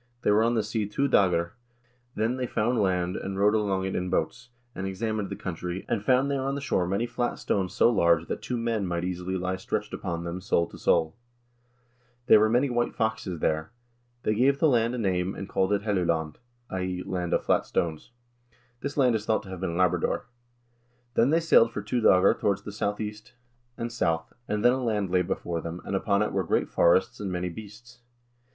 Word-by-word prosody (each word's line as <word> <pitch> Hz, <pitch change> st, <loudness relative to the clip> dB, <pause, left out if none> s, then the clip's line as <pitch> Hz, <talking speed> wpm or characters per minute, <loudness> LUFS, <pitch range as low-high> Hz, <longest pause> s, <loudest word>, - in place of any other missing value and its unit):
They -, -, +3 dB
were 105 Hz, +1 st, +4 dB
on 120 Hz, +1 st, +2 dB
the 110 Hz, -, +1 dB
sea 110 Hz, 0 st, -2 dB
two 140 Hz, +7 st, 0 dB
doegr} 90 Hz, -8 st, +2 dB, 0.6 s
Then 115 Hz, +4 st, 0 dB
they 125 Hz, -1 st, -2 dB
found 120 Hz, +1 st, 0 dB
land, 90 Hz, -2 st, 0 dB
and 95 Hz, 0 st, -4 dB
rowed 105 Hz, +2 st, +4 dB
along 100 Hz, -3 st, 0 dB
it 95 Hz, -, -3 dB
in 90 Hz, 0 st, -2 dB
boats, 125 Hz, +7 st, -2 dB, 0.2 s
and 95 Hz, +1 st, -4 dB
examined 105 Hz, +1 st, -2 dB
the -, -, -4 dB
country, 90 Hz, +1 st, -5 dB
and 110 Hz, -4 st, -1 dB
found 130 Hz, +4 st, +3 dB
there 140 Hz, -1 st, 0 dB
on 135 Hz, +1 st, -1 dB
the -, -, -3 dB
shore 90 Hz, -10 st, 0 dB
many 100 Hz, +5 st, 0 dB
flat 120 Hz, 0 st, -2 dB
stones 95 Hz, -3 st, -1 dB
so -, -, +5 dB
large 85 Hz, -6 st, +3 dB
that -, -, -4 dB
two 125 Hz, -, -3 dB
men 115 Hz, -4 st, -1 dB
might 85 Hz, 0 st, -2 dB
easily 90 Hz, +1 st, -3 dB
lie 90 Hz, +1 st, -2 dB
stretched 105 Hz, +3 st, -3 dB
upon 85 Hz, -3 st, -4 dB
them 85 Hz, +2 st, -5 dB
sole 85 Hz, -3 st, +1 dB
to -, -, -11 dB
sole. 80 Hz, -1 st, +2 dB, 1.1 s
There 110 Hz, -, +7 dB
were 110 Hz, +1 st, +4 dB
many 125 Hz, +5 st, +3 dB
white 120 Hz, -2 st, -1 dB
foxes 105 Hz, -6 st, -2 dB
there. 80 Hz, +7 st, -1 dB, 0.5 s
They 105 Hz, -, +1 dB
gave 135 Hz, +5 st, +3 dB
the 160 Hz, -, +3 dB
land 120 Hz, -3 st, +2 dB
a -, -, -4 dB
name 95 Hz, -4 st, 0 dB
and 95 Hz, -, -6 dB
called 95 Hz, +1 st, 0 dB
it 100 Hz, 0 st, +1 dB
'Helluland' 85 Hz, -7 st, 0 dB, 0.3 s
{i.e. 90 Hz, -1 st, -3 dB
Land 90 Hz, -2 st, -3 dB
of -, -, +1 dB
Flat -, -, +1 dB
Stones)." 80 Hz, -2 st, -2 dB, 0.7 s
This 140 Hz, +3 st, -5 dB
land 130 Hz, -4 st, +4 dB
is 110 Hz, -2 st, -1 dB
thought 110 Hz, -, +1 dB
to 95 Hz, -, -12 dB
have 95 Hz, -1 st, -7 dB
been 85 Hz, -3 st, -2 dB
Labrador. 90 Hz, 0 st, +1 dB, 0.9 s
Then 120 Hz, +2 st, +3 dB
they 160 Hz, +3 st, +4 dB
sailed 140 Hz, -8 st, +5 dB
for 100 Hz, -, -5 dB
two 120 Hz, +3 st, -1 dB
doegr 95 Hz, -2 st, +5 dB
towards 100 Hz, -2 st, 0 dB
the 105 Hz, -, -7 dB
southeast 105 Hz, +3 st, -4 dB, 0.4 s
and 115 Hz, 0 st, -4 dB
south, 80 Hz, -8 st, -1 dB
and 105 Hz, +2 st, -1 dB
then 120 Hz, -, +7 dB
a 130 Hz, 0 st, -2 dB
land 105 Hz, -5 st, -1 dB
lay 90 Hz, 0 st, +3 dB
before 85 Hz, -2 st, -3 dB
them, 85 Hz, +1 st, -6 dB
and 100 Hz, -, -2 dB
upon 100 Hz, +1 st, +1 dB
it -, -, -2 dB
were 95 Hz, -1 st, 0 dB
great -, -, 0 dB
forests 90 Hz, +2 st, +3 dB
and 100 Hz, -2 st, -3 dB
many 90 Hz, 0 st, -2 dB
beasts. 110 Hz, +5 st, -11 dB
100 Hz, 210 wpm, -27 LUFS, 90-115 Hz, 1.1 s, There